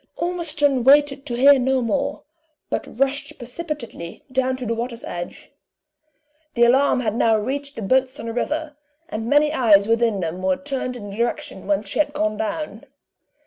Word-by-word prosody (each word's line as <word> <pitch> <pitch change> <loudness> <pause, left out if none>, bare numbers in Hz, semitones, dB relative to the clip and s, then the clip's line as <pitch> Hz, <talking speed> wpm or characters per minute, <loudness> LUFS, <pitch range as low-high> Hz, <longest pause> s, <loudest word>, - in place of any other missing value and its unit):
Ormiston, 305 -7 0
waited 280 +1 +4
to 240 - -2
hear 275 +2 +6
no 265 +1 +2
more, 245 +3 -1 0.5
but - - -4
rushed 285 +2 -1
precipitately 250 - -7
down 260 0 0
to 255 - -5
the 230 - 0
waters 235 0 -4
edge. 175 0 -7 1.0
The 235 - +4
alarm 255 +2 +4
has 215 -4 -1
now 225 -1 +3
reached 280 +6 -3
the 225 - -5
boats 260 +5 +1
on - - -6
the 230 - -4
river, 300 +5 -2 0.3
and 225 -4 -4
many 295 +1 +4
eyes 210 -7 +5
within 230 -2 +2
them 175 +1 -3
were 185 0 +1
turned 270 -3 -4
in 205 -3 -8
the 200 - -8
direction 235 -4 -3
whence 205 +1 0
she - - -3
had 295 -1 +2
gone 215 -6 0
down. 260 +8 -4
255 Hz, 175 wpm, -22 LUFS, 225-285 Hz, 1.0 s, hear